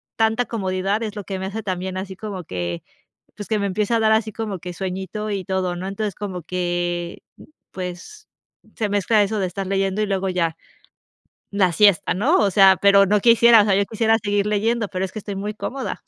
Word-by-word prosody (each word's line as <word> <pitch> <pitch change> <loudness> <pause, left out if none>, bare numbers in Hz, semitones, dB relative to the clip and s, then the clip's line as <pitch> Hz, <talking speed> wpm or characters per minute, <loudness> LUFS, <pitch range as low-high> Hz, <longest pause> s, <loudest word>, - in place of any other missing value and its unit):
tanta 225 +2 +1
comodidad 195 0 -2
es 215 -1 -5
lo 205 - -5
que 195 0 -5
me 190 - -4
hace 205 +3 -4
también 185 -2 -4
así 190 0 -6
como 195 -3 -7
que 85 - -4 0.5
pues 205 - -8
que 220 - +1
me 200 - -1
empieza 210 +4 0
a - - +1
dar 220 0 +3
así 220 0 +1
como 210 -3 -4
que 180 +1 -8
sueñito 190 +4 -4
y 195 -2 -3
todo, 185 -2 -1
¿no? 180 +2 -5
Entonces, 200 0 -3
como 190 -3 -6
que, 175 0 -3 0.5
pues 185 - -8 0.5
se 210 -3 -1
mezcla 205 +1 +3
eso 210 +2 -1
de 190 - 0
estar 190 +2 -5
leyendo 195 +1 0
y 210 - 0
luego 195 -1 -1
ya 170 -3 -1 0.9
la 195 -3 +2
siesta, 200 0 +4
¿no? 245 - +2
O 200 - +2
sea, 195 -1 +6
pero 200 0 +6
no 210 +1 +2
quisiera 230 0 +6
o - - 0
sea, 205 -2 +2
yo 200 0 +1
quisiera 225 +1 +2
seguir 205 -1 0
leyendo, 215 +1 0
pero 185 +1 -2
es 185 - -13
que 215 - -6
estoy 200 -1 -6
muy 205 +2 -4
cómoda. 260 +5 -5
200 Hz, 215 wpm, -21 LUFS, 185-215 Hz, 0.9 s, sea